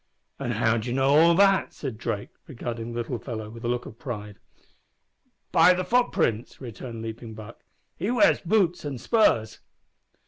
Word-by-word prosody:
"And -, -, -2 dB
how 110 Hz, +1 st, +2 dB
d'ye 115 Hz, +2 st, -3 dB
know 135 Hz, +2 st, +3 dB
all 170 Hz, +2 st, +6 dB
that?" 195 Hz, +1 st, +3 dB
said 130 Hz, -7 st, -6 dB
Drake, 100 Hz, -3 st, -4 dB, 0.2 s
regarding 120 Hz, -4 st, -5 dB
the 120 Hz, -, -6 dB
little 120 Hz, 0 st, -4 dB
fellow 110 Hz, -4 st, -6 dB
with 115 Hz, +1 st, -11 dB
a -, -, -2 dB
look 120 Hz, 0 st, -1 dB
of 110 Hz, -, -11 dB
pride. 105 Hz, -5 st, -7 dB, 1.1 s
"By 180 Hz, -, +6 dB
the 185 Hz, -, -1 dB
footprints," 230 Hz, -, 0 dB
returned 115 Hz, -2 st, -8 dB
Leaping 115 Hz, 0 st, -7 dB
Buck. 110 Hz, +1 st, -11 dB, 0.3 s
"He 195 Hz, +6 st, -3 dB
wears 245 Hz, -2 st, +4 dB
boots 180 Hz, -2 st, +1 dB
and 140 Hz, -4 st, -5 dB
spurs." 115 Hz, -, +2 dB
120 Hz, 165 wpm, -26 LUFS, 115-170 Hz, 1.1 s, all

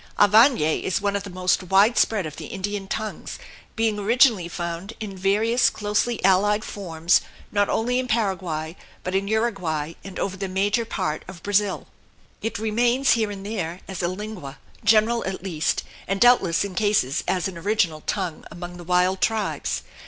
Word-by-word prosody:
Guarany 210 Hz, -, +5 dB
is 185 Hz, -, 0 dB
one 200 Hz, 0 st, -1 dB
of 200 Hz, -, -1 dB
the 200 Hz, -, -8 dB
most 180 Hz, 0 st, +1 dB
wide 195 Hz, +6 st, +4 dB
spread 210 Hz, -5 st, +2 dB
of 155 Hz, -1 st, -7 dB
the -, -, -7 dB
Indian 200 Hz, 0 st, -4 dB
tongues, 215 Hz, +2 st, -5 dB, 0.4 s
being 225 Hz, -2 st, 0 dB
originally 225 Hz, -3 st, +4 dB
found 170 Hz, +4 st, -5 dB
in 210 Hz, -3 st, -6 dB
various 215 Hz, +6 st, +2 dB
closely 210 Hz, +3 st, -1 dB
allied 205 Hz, +3 st, +3 dB
forms 170 Hz, -3 st, +1 dB, 0.3 s
not 205 Hz, -1 st, +2 dB
only 245 Hz, +3 st, +1 dB
in 255 Hz, -, -2 dB
Paraguay 185 Hz, -8 st, -1 dB, 0.3 s
but 185 Hz, -, -3 dB
in 195 Hz, +1 st, 0 dB
Uruguay 190 Hz, -9 st, -1 dB
and 195 Hz, -1 st, -9 dB
over 190 Hz, -1 st, -2 dB
the 195 Hz, +1 st, -4 dB
major 205 Hz, +5 st, 0 dB
part 155 Hz, -7 st, -2 dB
of 185 Hz, -3 st, -11 dB
Brazil. 205 Hz, -1 st, +1 dB, 0.6 s
It 225 Hz, -, -3 dB
remains 235 Hz, +5 st, +2 dB
here 220 Hz, -3 st, +2 dB
and 200 Hz, -1 st, -7 dB
there, 185 Hz, -5 st, -4 dB
as 190 Hz, -1 st, -5 dB
a 175 Hz, -, +1 dB
lingua 185 Hz, -7 st, -6 dB, 0.3 s
general 220 Hz, +2 st, +4 dB
at 190 Hz, -1 st, -4 dB
least, 165 Hz, -5 st, -1 dB, 0.2 s
and 195 Hz, +1 st, -1 dB
doubtless 195 Hz, -8 st, +4 dB
in 200 Hz, -, -6 dB
cases 195 Hz, -10 st, +1 dB
as 180 Hz, 0 st, 0 dB
an 190 Hz, -, -7 dB
original 170 Hz, -5 st, 0 dB
tongue, 185 Hz, -6 st, -2 dB
among 175 Hz, 0 st, -8 dB
the 175 Hz, -, -9 dB
wild 180 Hz, +2 st, +2 dB
tribes. 220 Hz, -2 st, -1 dB
195 Hz, 170 wpm, -24 LUFS, 180-215 Hz, 0.6 s, Guarany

